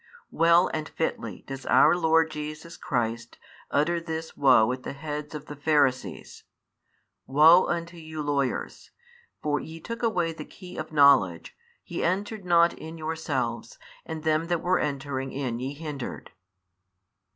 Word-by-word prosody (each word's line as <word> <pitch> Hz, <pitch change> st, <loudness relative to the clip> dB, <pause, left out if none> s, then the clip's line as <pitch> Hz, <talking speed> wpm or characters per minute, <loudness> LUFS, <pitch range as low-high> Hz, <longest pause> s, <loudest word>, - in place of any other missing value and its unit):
Well 170 Hz, +2 st, +4 dB
and 155 Hz, -1 st, -3 dB
fitly 160 Hz, -, -3 dB
does 135 Hz, 0 st, -7 dB
our -, -, +6 dB
Lord 160 Hz, -2 st, +3 dB
Jesus 155 Hz, +2 st, -7 dB
the -, -, -19 dB
Christ 115 Hz, -5 st, -2 dB, 0.3 s
utter 170 Hz, +4 st, +1 dB
this 160 Hz, -1 st, -5 dB
woe 125 Hz, -5 st, +5 dB
at 130 Hz, 0 st, -4 dB
the -, -, -6 dB
heads 150 Hz, +1 st, -6 dB
of 150 Hz, 0 st, -7 dB
the 150 Hz, -, -8 dB
Pharisees: 145 Hz, -3 st, 0 dB, 0.8 s
Woe 155 Hz, +6 st, +6 dB
unto 170 Hz, 0 st, -3 dB
you 155 Hz, -1 st, -6 dB
lawyers! 140 Hz, -3 st, -2 dB, 0.5 s
for 145 Hz, -1 st, +1 dB
ye 160 Hz, +1 st, -9 dB
took 230 Hz, +7 st, -6 dB
away 180 Hz, -8 st, 0 dB
the 155 Hz, -1 st, -9 dB
hey 180 Hz, -1 st, -11 dB
of -, -, -6 dB
knowledge: 140 Hz, -, +4 dB, 0.3 s
ye -, -, -4 dB
entered 200 Hz, +3 st, -1 dB
not 170 Hz, -1 st, +4 dB
in 160 Hz, +1 st, -9 dB
yourselves, 155 Hz, -6 st, -3 dB, 0.3 s
and 160 Hz, -1 st, -6 dB
them 160 Hz, +1 st, +1 dB
that 175 Hz, -1 st, -1 dB
were 180 Hz, +1 st, +2 dB
entering 135 Hz, -2 st, -3 dB
in 130 Hz, -4 st, -3 dB
ye 135 Hz, +3 st, -4 dB
hindered. 145 Hz, -4 st, -7 dB
155 Hz, 150 wpm, -26 LUFS, 140-165 Hz, 0.8 s, our